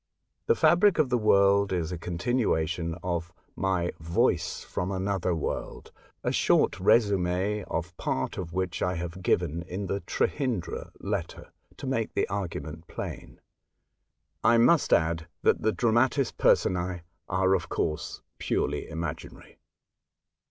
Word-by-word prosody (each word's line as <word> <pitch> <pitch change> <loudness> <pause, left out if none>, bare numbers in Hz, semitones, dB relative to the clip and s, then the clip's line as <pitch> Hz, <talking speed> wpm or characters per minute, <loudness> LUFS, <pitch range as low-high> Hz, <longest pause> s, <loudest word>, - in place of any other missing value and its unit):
The 460 - +5
fabric 190 - +4
of 155 -5 +3
the 125 - +2
work 100 -2 +4
is 85 -2 -1
a 90 - -3
continuation 85 -4 -1
ot 85 -2 -1 0.3
my 95 -3 0
"Voice 85 +2 0
from 90 +2 -3
Another 95 -1 -1
World/' 80 - -4 0.3
a - - 0
short - - +2
resume 100 -1 +2
of 85 +1 -4
part 65 - -2
of 85 -3 -5
which 95 0 -2
I 90 0 0
have 85 +2 -5
given 85 -2 +1
in 90 +3 -5
the 100 +1 -2
Trehyndra 125 - -2
letter, 100 -4 -4 0.3
to 140 - -7
make 120 -4 -1
the - - +1
argument 85 -4 -5
plain. - - -7 1.0
I 115 - +5
must 150 +8 +4
add 80 0 +2 0.2
that - - +3
the 110 - +2
dramatis 120 +6 +2
personce 90 - +3 0.5
are, 95 0 +3
ot 85 -3 -3
course, 75 - -3 0.2
purely - - -1
imaginary. 80 0 -6
95 Hz, 130 wpm, -28 LUFS, 85-105 Hz, 1.0 s, The